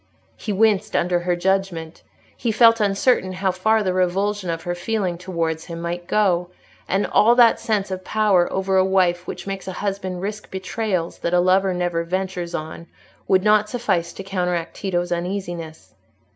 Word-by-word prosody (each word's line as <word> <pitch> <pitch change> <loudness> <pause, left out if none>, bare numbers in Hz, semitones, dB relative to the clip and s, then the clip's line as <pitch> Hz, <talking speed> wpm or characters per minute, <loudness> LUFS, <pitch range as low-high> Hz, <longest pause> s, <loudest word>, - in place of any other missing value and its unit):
He 215 - -5
winced 210 0 +2
under 175 0 +2
her 175 0 0
judgment, 175 -3 -1 0.3
he 235 - -1
felt 230 +1 +5
uncertain 200 -1 +2
how 190 +1 0
far 220 +4 +1
the 185 -2 0
revulsion 185 +1 0
of 165 0 -3
her 175 - -2
feeling 185 0 -2
towards 165 -3 -3
him 170 -1 -7
might 175 +1 -4
go; 180 -5 +1 0.4
and 195 +2 +1
all 235 +3 +4
that 240 -2 +5
sense 215 -4 -1
of 185 0 -4
power 205 -5 +2
over 190 0 0
a 185 - +5
wife 185 -2 +1
which - - -6
makes 195 -1 -5
a 190 - -4
husband 190 -2 -4
risk 210 +1 -5
betrayals 190 -2 -3
that 170 +1 0
a - - +5
lover 185 +2 +3
never 175 -2 -1
ventures 180 0 -3
on, 160 +2 -6 0.4
would 185 -1 +3
not 210 0 +3
suffice 190 -8 -1
to 195 - -8
counteract 180 -3 -2
Tito's 175 -3 -2
uneasiness. 175 -2 -5
185 Hz, 170 wpm, -22 LUFS, 175-205 Hz, 0.4 s, felt